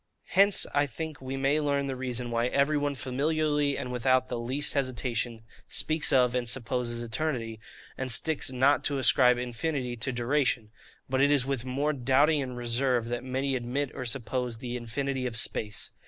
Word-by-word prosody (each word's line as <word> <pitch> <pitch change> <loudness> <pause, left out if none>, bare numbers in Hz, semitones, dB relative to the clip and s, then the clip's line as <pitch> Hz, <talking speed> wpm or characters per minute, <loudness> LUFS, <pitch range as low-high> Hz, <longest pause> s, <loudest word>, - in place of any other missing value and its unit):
Hence 200 +1 +5
I 145 0 +3
think 155 +3 -6
we 130 +1 -4
may 140 +3 +2
learn 140 -2 0
the 135 -1 -3
reason 125 -2 -4
why 115 +1 +1
every 140 +4 +2
one 145 -1 0
familiarly 145 +3 0
and 125 - -4
without 130 +1 +2
the 120 - -3
least 130 +5 -1
hesitation 120 -4 -2 0.2
speaks 155 0 +1
of 125 -2 +4
and 125 -2 0
supposes 120 -1 -1
Eternity, 115 -3 -3 0.4
and 130 -1 -1
sticks 145 +3 +2
not 135 +3 +3
to 145 - 0
ascribe 125 -1 +4
INFINITY 125 +1 -2
to 115 +4 -2
DURATION; 120 -2 0 0.4
but 130 0 +1
it 140 - +5
is 145 -3 +3
with 135 -3 -2
more 140 +4 0
doubting 140 +3 +3
and 125 -2 -5
reserve 120 0 0
that 120 0 -3
many 130 +1 -1
admit 130 +3 -2
or 130 - -5
suppose 125 -1 -2
the 120 +1 -5
INFINITY 130 +2 -2
OF 115 -2 -4
SPACE. 105 -2 -3
130 Hz, 175 wpm, -28 LUFS, 120-140 Hz, 0.4 s, Hence